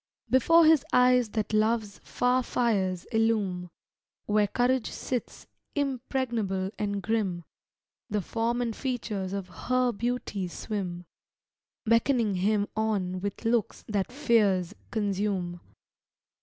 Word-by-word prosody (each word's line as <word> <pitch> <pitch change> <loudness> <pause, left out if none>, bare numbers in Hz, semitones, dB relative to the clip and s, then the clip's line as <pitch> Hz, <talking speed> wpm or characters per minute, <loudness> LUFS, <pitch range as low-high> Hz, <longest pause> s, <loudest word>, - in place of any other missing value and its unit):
Before 330 +6 +6
his 310 -4 +6
eyes 250 -2 +4
that 215 0 -2
love's 215 -1 +1
far 250 +1 +1
fires 195 -8 0
illume 210 -6 +1 0.6
Where 210 0 +3
courage 245 +3 +1
sits, 250 -2 -4 0.3
impregnable 240 -8 -1
and 200 -1 -2
grim 200 -6 -1 0.7
The 205 -2 -1
form 235 +4 -1
and 230 -2 -3
features 220 -8 -3
of 195 -2 -4
her 255 +6 0
beauty 235 -4 -2
swim, 180 -2 -5 0.8
Beckoning 230 -1 +3
him 205 +2 +1
on 200 -4 -1
with 200 +3 -5
looks 230 -2 0
that 205 0 -1
fears 210 - +2 0.2
consume. 195 -4 -1
215 Hz, 110 wpm, -28 LUFS, 195-245 Hz, 0.8 s, Before